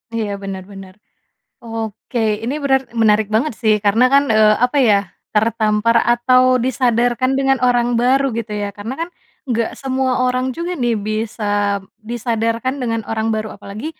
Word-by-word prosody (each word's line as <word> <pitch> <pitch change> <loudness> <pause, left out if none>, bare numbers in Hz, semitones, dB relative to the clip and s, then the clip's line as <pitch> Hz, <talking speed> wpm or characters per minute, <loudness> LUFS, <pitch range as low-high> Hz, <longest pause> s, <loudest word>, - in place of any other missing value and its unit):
Iya 220 -2 -2
bener 190 -1 -5
bener. 195 -1 -11 0.7
Oke, 225 +1 -5 0.2
ini 245 +4 -2
benar 265 -1 +3 0.2
menarik 215 -1 +3
banget 250 +5 +1
sih, 220 -2 +4
karena 210 +4 +4
kan, 280 0 +6
eee, 215 -1 +5
apa 250 +4 -3
ya, 205 - +5 0.4
tertampar 220 +1 +2
atau 255 +1 +4 0.2
disadarkan 245 0 +1
dengan 270 0 +2
orang 245 -1 +2
baru 265 +3 +3
gitu 230 -1 -4
ya 205 - -2
karena 215 +5 -5
kan - - -16 0.4
nggak 230 -1 0
semua 265 -1 0
orang 255 0 0
juga 340 +1 -3
nih, 240 -2 +1
bisa, 215 +1 -3 0.7
disadarkan 230 +2 -1
dengan 230 -2 -1
orang 220 0 -1
baru 215 0 -2
apalagi 205 +6 -8
230 Hz, 150 wpm, -18 LUFS, 215-255 Hz, 0.7 s, kan